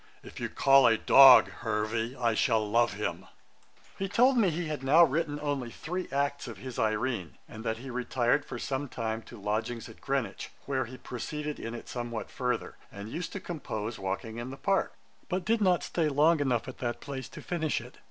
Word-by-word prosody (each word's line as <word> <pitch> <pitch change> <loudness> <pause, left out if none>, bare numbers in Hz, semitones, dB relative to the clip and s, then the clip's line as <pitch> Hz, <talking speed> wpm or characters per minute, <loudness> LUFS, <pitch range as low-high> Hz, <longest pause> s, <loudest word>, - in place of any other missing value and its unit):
If - - -10
you - - -3
call 135 -2 +5
a 115 -1 +4
dog 135 +3 +8
HERVEY, 110 +2 -2
I 120 -2 +1
shall 110 -2 +2
love 115 0 +2
him.' 95 -3 -4 0.7
He 195 0 -2
told 250 +6 +4
me 220 -6 +4
he 170 +1 -2
had 150 -3 -4
now 150 +6 +7
written 150 -1 0
only 145 -5 -2
three 180 +9 -5
acts 140 0 -1
of 115 -4 -7
his 130 +3 -7
Irene, 110 -4 -1
and 110 0 -9
that 110 -1 -1
he 130 +2 -8
retired 125 +2 +1
for 130 - -7
some 135 +3 -3
time 110 -2 -3
to 115 0 -13
lodgings 110 +3 -2
at 110 - -15
Greenwich, 130 -8 -2 0.2
where 130 -2 -1
he 130 +2 -10
proceeded 150 +5 -5
in 115 +1 -5
it - - -9
somewhat 120 -3 -5
further, 125 -2 -2
and 100 +2 -8
used 165 0 -4
to 200 - -4
compose, 115 - -5
walking 100 +4 -4
in 120 +2 -5
the 135 - -8
Park; 195 +4 0 0.3
but 185 -1 -2
did 225 0 +2
not 185 -3 +3
stay 160 -3 0
long 150 +3 +4
enough 130 -5 0
at 130 - -8
that 120 -2 -2
place 135 -2 -6
to - - -10
finish 160 -4 -1
it. 120 +2 -13
130 Hz, 200 wpm, -29 LUFS, 115-150 Hz, 0.7 s, dog